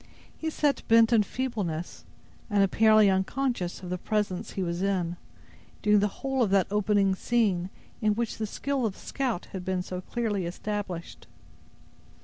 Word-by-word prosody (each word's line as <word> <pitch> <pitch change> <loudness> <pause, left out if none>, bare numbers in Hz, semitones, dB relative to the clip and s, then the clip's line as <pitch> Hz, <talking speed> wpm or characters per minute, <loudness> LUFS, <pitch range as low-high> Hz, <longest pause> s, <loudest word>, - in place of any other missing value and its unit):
He 320 - -3
sat 290 -4 +1
bent 230 +1 +6
in 225 - +6
feebleness, 205 -8 -3 0.4
and 205 -2 +3
apparently 215 +1 +5
unconscious 190 0 -1
of 180 - -6
the 180 - -2
presence 205 -2 -2
he 190 - -2
was 170 0 -2
in, 185 -3 0 0.7
during 210 0 +5
the 205 - +2
whole 270 +5 -2
of 225 - +3
that 195 -2 +4
opening 205 -1 +2
scene, 190 -4 +1 0.3
in 215 -1 +2
which 230 -1 -2
the 215 - -1
skill 270 +2 -1
of 200 - -4
the - - -17
scout 250 -10 -3
had 190 -2 -5
been 185 0 -1
so 180 0 -5
clearly 205 -4 -2
established. 185 -2 -5
205 Hz, 160 wpm, -28 LUFS, 185-230 Hz, 0.7 s, bent